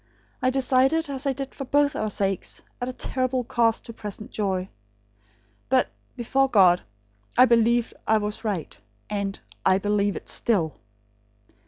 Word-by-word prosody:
I 255 Hz, -, +3 dB
decided 270 Hz, +4 st, +2 dB
as 275 Hz, +1 st, -2 dB
I 275 Hz, -, +2 dB
did 275 Hz, 0 st, -6 dB
for 275 Hz, -, -6 dB
both 285 Hz, +1 st, +2 dB
our 215 Hz, -, -1 dB
sakes, 195 Hz, -2 st, -2 dB, 0.2 s
at 250 Hz, +1 st, -4 dB
terrible 255 Hz, -1 st, -1 dB
cost 230 Hz, -1 st, +1 dB
to 230 Hz, -, -8 dB
present 215 Hz, +2 st, -8 dB
joy. 190 Hz, -3 st, -1 dB, 1.0 s
But, -, -, +3 dB, 0.3 s
before 270 Hz, +3 st, +1 dB
God, 185 Hz, -6 st, +5 dB, 0.6 s
I 250 Hz, -, +9 dB
believed 235 Hz, 0 st, +3 dB
I 220 Hz, -, +4 dB
was 210 Hz, +1 st, -3 dB
right; 200 Hz, -8 st, -3 dB, 0.4 s
and 200 Hz, -1 st, -2 dB, 0.2 s
I 185 Hz, -, +4 dB
BELIEVE 205 Hz, 0 st, 0 dB
IT -, -, -8 dB
STILL." 175 Hz, -, +1 dB
230 Hz, 145 wpm, -25 LUFS, 205-260 Hz, 1.0 s, I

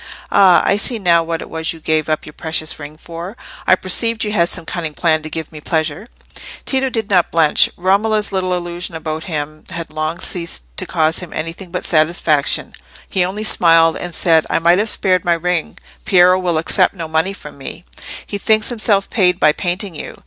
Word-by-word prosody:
"Ah! 190 Hz, -3 st, +6 dB
I 200 Hz, -, +3 dB
see 235 Hz, +3 st, -1 dB
now 175 Hz, -5 st, +3 dB
what 165 Hz, 0 st, -3 dB
it -, -, -12 dB
was 160 Hz, 0 st, -2 dB
you 165 Hz, -, -12 dB
gave 155 Hz, 0 st, 0 dB
up 155 Hz, -, -1 dB
your 150 Hz, -, -11 dB
precious 155 Hz, -1 st, -3 dB
ring 145 Hz, +1 st, -9 dB
for. 170 Hz, +7 st, -8 dB, 0.3 s
I 185 Hz, -, +7 dB
perceived 220 Hz, +5 st, +1 dB
you 210 Hz, -, -2 dB
had 170 Hz, -4 st, +2 dB
some -, -, -3 dB
cunning 160 Hz, -4 st, -4 dB
plan 160 Hz, -1 st, +2 dB
to 155 Hz, -, -7 dB
give 160 Hz, 0 st, -6 dB
me 155 Hz, -1 st, -10 dB
pleasure." 160 Hz, +5 st, -2 dB, 0.6 s
Tito 265 Hz, 0 st, 0 dB
did 225 Hz, -4 st, -2 dB
not 180 Hz, -3 st, +3 dB
blench. 160 Hz, -2 st, +3 dB
Romola's 210 Hz, +4 st, +1 dB
little 185 Hz, -1 st, 0 dB
illusions 175 Hz, -1 st, -4 dB
about 160 Hz, 0 st, -5 dB
himself 155 Hz, -2 st, -5 dB
had 165 Hz, -3 st, -6 dB
long 155 Hz, +2 st, -2 dB
ceased 170 Hz, -, -4 dB
to -, -, -2 dB
cause 160 Hz, 0 st, +1 dB
him 180 Hz, -3 st, -8 dB
anything 165 Hz, +4 st, -5 dB
but 180 Hz, +1 st, -5 dB
satisfaction. 155 Hz, -2 st, +2 dB, 0.3 s
He 185 Hz, -, 0 dB
only 195 Hz, +4 st, -3 dB
smiled 165 Hz, -5 st, +4 dB
and 175 Hz, -2 st, -6 dB
said— 165 Hz, -3 st, +3 dB
"I -, -, +1 dB
might 170 Hz, +3 st, +4 dB
have 215 Hz, +1 st, +1 dB
spared 185 Hz, -4 st, +1 dB
my 175 Hz, -, +2 dB
ring; 175 Hz, -1 st, -2 dB, 0.3 s
Piero 180 Hz, 0 st, +5 dB
will 175 Hz, -3 st, 0 dB
accept 165 Hz, +4 st, +1 dB
no 165 Hz, -3 st, -5 dB
money 160 Hz, +5 st, 0 dB
from 150 Hz, -7 st, -12 dB
me; 160 Hz, +6 st, -8 dB, 0.4 s
he 200 Hz, -, -5 dB
thinks 215 Hz, +1 st, +2 dB
himself 215 Hz, -4 st, +1 dB
paid 180 Hz, -4 st, +2 dB
by 150 Hz, -, +5 dB
painting 180 Hz, +4 st, -3 dB
you. 150 Hz, -, -8 dB
170 Hz, 200 wpm, -17 LUFS, 160-190 Hz, 0.6 s, I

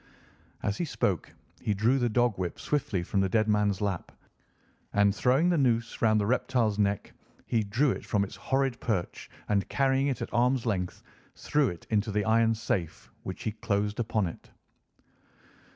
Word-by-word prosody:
As 100 Hz, -, -1 dB
he 175 Hz, -, 0 dB
spoke 150 Hz, -, -1 dB, 0.3 s
he 105 Hz, -, 0 dB
drew 115 Hz, +7 st, +2 dB
the 120 Hz, -1 st, +1 dB
dog 120 Hz, -1 st, +2 dB
whip 90 Hz, -2 st, -3 dB
swiftly 115 Hz, -11 st, -1 dB
from 100 Hz, -, -1 dB
the 95 Hz, -, +1 dB
dead 110 Hz, +2 st, +2 dB
man's 105 Hz, -2 st, +1 dB
lap, 100 Hz, -4 st, -2 dB, 0.8 s
and 100 Hz, 0 st, +4 dB
throwing 130 Hz, -, +3 dB
the 170 Hz, -3 st, +2 dB
noose 120 Hz, -3 st, +1 dB
round 110 Hz, -1 st, +4 dB
the 100 Hz, -, 0 dB
reptile's 115 Hz, -2 st, +1 dB
neck 100 Hz, 0 st, 0 dB, 0.3 s
he 115 Hz, -2 st, +1 dB
drew 120 Hz, +7 st, +1 dB
it -, -, -4 dB
from 105 Hz, -2 st, +1 dB
its 100 Hz, +1 st, -6 dB
horrid 135 Hz, +4 st, 0 dB
perch 95 Hz, -7 st, -3 dB, 0.2 s
and, 100 Hz, -2 st, 0 dB
carrying 135 Hz, 0 st, +2 dB
it 135 Hz, -5 st, -1 dB
at -, -, -8 dB
arm's 125 Hz, +1 st, +2 dB
length, 95 Hz, -5 st, -2 dB, 0.3 s
threw 145 Hz, -3 st, +1 dB
it 85 Hz, -, -9 dB
into 110 Hz, 0 st, +1 dB
the 105 Hz, 0 st, 0 dB
iron 115 Hz, 0 st, +3 dB
safe, 90 Hz, -6 st, -3 dB
which -, -, -6 dB
he 110 Hz, -, -1 dB
closed 105 Hz, 0 st, -1 dB
upon 110 Hz, -3 st, 0 dB
it. 85 Hz, -, -8 dB
110 Hz, 175 wpm, -28 LUFS, 100-125 Hz, 0.8 s, and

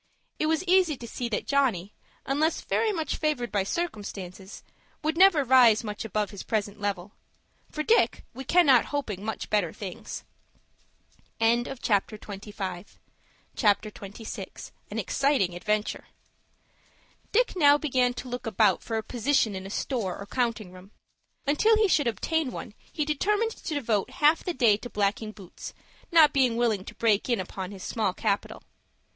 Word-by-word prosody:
It 310 Hz, -, +1 dB
was 320 Hz, +2 st, +1 dB
easy 365 Hz, -5 st, +3 dB
to 235 Hz, -, -9 dB
see 240 Hz, +1 st, -4 dB
that 215 Hz, -, -2 dB
Johnny, 230 Hz, -9 st, +1 dB, 0.3 s
unless 305 Hz, +4 st, +1 dB
very 445 Hz, -, 0 dB
much 325 Hz, -6 st, -2 dB
favored 295 Hz, -6 st, -1 dB
by 200 Hz, -, +1 dB
circumstances, 200 Hz, -, -5 dB, 0.4 s
would 310 Hz, +1 st, 0 dB
never 355 Hz, -4 st, +6 dB
rise 245 Hz, -4 st, +6 dB
much 210 Hz, -1 st, -5 dB
above 210 Hz, -2 st, -2 dB
his 200 Hz, -, -7 dB
present 210 Hz, -2 st, -2 dB
level. 200 Hz, -1 st, -3 dB, 0.6 s
For 305 Hz, -, -3 dB
Dick, 455 Hz, +8 st, +2 dB
we 265 Hz, -, -7 dB
cannot 275 Hz, -5 st, +5 dB
help 285 Hz, -4 st, -3 dB
hoping 195 Hz, 0 st, -6 dB
much 220 Hz, 0 st, -5 dB
better 205 Hz, -6 st, +2 dB
things. 190 Hz, -4 st, -7 dB, 1.2 s
CHAPTER 230 Hz, -2 st, +1 dB
XXVI. 205 Hz, +1 st, -4 dB, 0.5 s
AN -, -, -6 dB
EXCITING 270 Hz, -11 st, +1 dB
ADVENTURE 210 Hz, +4 st, -2 dB, 1.2 s
Dick 485 Hz, +4 st, +2 dB
now 290 Hz, -4 st, +6 dB
began 255 Hz, -4 st, +1 dB
to 255 Hz, -, -7 dB
look 250 Hz, 0 st, -5 dB
about 220 Hz, -, +3 dB
for 225 Hz, -, -3 dB
a 220 Hz, -, -2 dB
position 245 Hz, -1 st, +1 dB
in 190 Hz, 0 st, -6 dB
a -, -, -8 dB
store 210 Hz, -4 st, -2 dB
or 200 Hz, -, -8 dB
counting 230 Hz, -4 st, -2 dB
room. 185 Hz, +1 st, -14 dB, 0.6 s
Until 430 Hz, +11 st, +4 dB
he 435 Hz, -1 st, +4 dB
should 290 Hz, -8 st, +2 dB
obtain 285 Hz, -, 0 dB
one 225 Hz, -, -7 dB, 0.2 s
he 300 Hz, -, -1 dB
determined 415 Hz, +10 st, +1 dB
to 325 Hz, -7 st, -6 dB
devote 225 Hz, -6 st, 0 dB
half 300 Hz, +5 st, +3 dB
the 355 Hz, -, -3 dB
day 225 Hz, -5 st, +4 dB
to 245 Hz, -, -9 dB
blacking 210 Hz, +1 st, -1 dB
boots, 195 Hz, -4 st, -11 dB, 0.4 s
not 320 Hz, -3 st, +6 dB
being 255 Hz, -4 st, +3 dB
willing 225 Hz, -5 st, +1 dB
to -, -, -10 dB
break 220 Hz, 0 st, +1 dB
in 235 Hz, -4 st, +2 dB
upon 185 Hz, 0 st, -5 dB
his 195 Hz, -2 st, -9 dB
small 210 Hz, -5 st, -1 dB
capital. 205 Hz, -3 st, -2 dB
235 Hz, 155 wpm, -27 LUFS, 205-290 Hz, 1.2 s, never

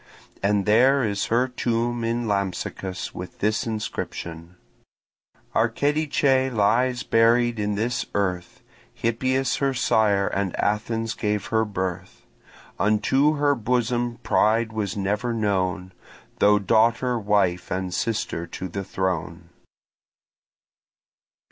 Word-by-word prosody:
And 100 Hz, 0 st, +1 dB
there 130 Hz, +6 st, +4 dB
is 100 Hz, -3 st, -1 dB
her 120 Hz, +3 st, +2 dB
tomb 120 Hz, -1 st, -1 dB
in 115 Hz, +1 st, -1 dB
Lampsacus 95 Hz, -1 st, -3 dB
with 90 Hz, 0 st, -8 dB
this 110 Hz, +4 st, 0 dB
inscription: 90 Hz, -6 st, -5 dB, 1.0 s
Archedice 135 Hz, +2 st, +1 dB
lies 120 Hz, +3 st, +2 dB
buried 115 Hz, 0 st, +3 dB
in 105 Hz, 0 st, -1 dB
this 120 Hz, +4 st, -1 dB
earth, 90 Hz, -3 st, -2 dB, 0.3 s
Hippias 130 Hz, +3 st, 0 dB
her 135 Hz, -1 st, 0 dB
sire, 105 Hz, -5 st, +2 dB
and 95 Hz, -2 st, -2 dB
Athens 115 Hz, +2 st, -1 dB
gave 105 Hz, -2 st, -2 dB
her 110 Hz, 0 st, +3 dB
birth; 95 Hz, -4 st, -5 dB, 0.5 s
Unto 130 Hz, +9 st, +2 dB
her 145 Hz, 0 st, +2 dB
bosom 120 Hz, 0 st, -1 dB
pride 110 Hz, +1 st, +2 dB
was 105 Hz, -3 st, -3 dB
never 105 Hz, +5 st, -1 dB
known, 95 Hz, -4 st, -1 dB, 0.5 s
Though 105 Hz, 0 st, +5 dB
daughter, 115 Hz, +4 st, +2 dB
wife, 100 Hz, -4 st, +1 dB
and 95 Hz, -1 st, -3 dB
sister 105 Hz, -6 st, -2 dB
to 95 Hz, -, -6 dB
the 95 Hz, +2 st, -5 dB
throne. 90 Hz, -3 st, -3 dB
110 Hz, 110 wpm, -24 LUFS, 100-120 Hz, 1.0 s, Though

